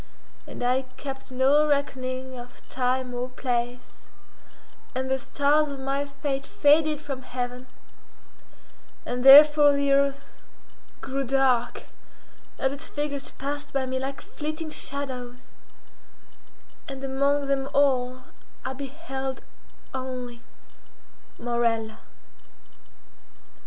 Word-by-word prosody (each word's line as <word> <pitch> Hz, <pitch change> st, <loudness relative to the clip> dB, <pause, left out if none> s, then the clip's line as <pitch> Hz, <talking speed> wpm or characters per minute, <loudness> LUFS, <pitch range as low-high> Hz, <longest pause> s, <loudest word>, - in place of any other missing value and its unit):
And -, -, -7 dB
I 250 Hz, +2 st, +2 dB, 0.2 s
kept 270 Hz, -1 st, -7 dB
no 275 Hz, +4 st, +4 dB
reckoning 260 Hz, -2 st, -1 dB
of 245 Hz, 0 st, -12 dB
time 255 Hz, 0 st, -1 dB
or 245 Hz, +1 st, -3 dB
place, 245 Hz, -1 st, -4 dB, 0.9 s
and 260 Hz, +1 st, -2 dB
the 265 Hz, -, +1 dB
stars 290 Hz, +3 st, +2 dB
of 280 Hz, -1 st, -6 dB
my 275 Hz, +1 st, -1 dB
fate 280 Hz, -1 st, -3 dB
faded 300 Hz, +1 st, +3 dB
from 280 Hz, -3 st, -6 dB
heaven, 250 Hz, 0 st, -5 dB, 1.4 s
and 245 Hz, 0 st, -3 dB
therefore 295 Hz, +1 st, +9 dB
the 280 Hz, 0 st, +1 dB
earth 280 Hz, 0 st, 0 dB, 0.6 s
grew 275 Hz, +1 st, -2 dB
dark, 260 Hz, -2 st, +1 dB, 0.7 s
and 265 Hz, 0 st, 0 dB
its 285 Hz, +3 st, -3 dB
figures 290 Hz, -2 st, -3 dB
passed 290 Hz, +2 st, -5 dB
by 270 Hz, -1 st, 0 dB
me 260 Hz, 0 st, -2 dB
like 270 Hz, +1 st, -4 dB
flitting 310 Hz, +1 st, -5 dB
shadows, 260 Hz, -4 st, -4 dB, 1.5 s
and 270 Hz, 0 st, -7 dB
among 280 Hz, +1 st, +1 dB
them 275 Hz, -1 st, 0 dB
all 255 Hz, -2 st, +2 dB, 0.4 s
I 260 Hz, -, -2 dB
beheld 270 Hz, -1 st, -5 dB, 0.5 s
only—Morella. 240 Hz, -2 st, -5 dB
270 Hz, 100 wpm, -26 LUFS, 255-280 Hz, 1.5 s, therefore